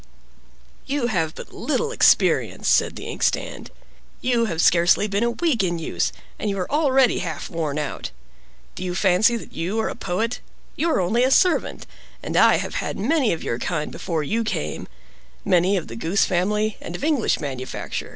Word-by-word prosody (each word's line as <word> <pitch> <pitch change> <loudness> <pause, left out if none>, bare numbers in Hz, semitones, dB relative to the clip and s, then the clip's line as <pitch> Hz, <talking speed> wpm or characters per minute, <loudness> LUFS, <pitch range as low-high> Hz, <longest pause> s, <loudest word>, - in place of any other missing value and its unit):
"You 275 -3 0
have 160 -4 0
but - - -10
little 465 -1 -1
experience," - - +3
said - - +3
the - - -8
ink - - -6
stand. - - -1 0.5
"You 240 -2 +1
have 170 -7 -3
scarcely 175 +4 +4
been 200 0 -1
a 235 - +2
week 255 - 0
in 175 -2 0
use, 165 - -1 0.3
and 210 - -1
you 195 - -2
are 180 - -3
already 270 -4 +3
half 165 -5 -5
worn 155 -4 -2
out. 150 -2 -4 0.6
Do - - -7
you 180 -1 -3
fancy 195 +5 +3
that - - -11
you 185 +7 -2
are 220 - 0
a - - -5
poet? 220 +6 -2 0.4
You 335 - 0
are 315 - +2
only 215 +7 +2
a 260 - +3
servant: 360 +6 +2 0.4
and - - -4
I - - +6
have - - -3
had - - -4
many 265 +2 +2
of 165 - -3
your 115 - -2
kind 150 0 -2
before 160 -3 -3
you 225 +10 -1
came—many 195 -3 -2
of 175 - -4
the 115 - -8
goose 165 +11 +1
family, 210 +4 0
and 170 - -6
of - - -7
English 295 -6 +1
manufacture. 130 -4 -5
195 Hz, 185 wpm, -23 LUFS, 170-235 Hz, 0.6 s, I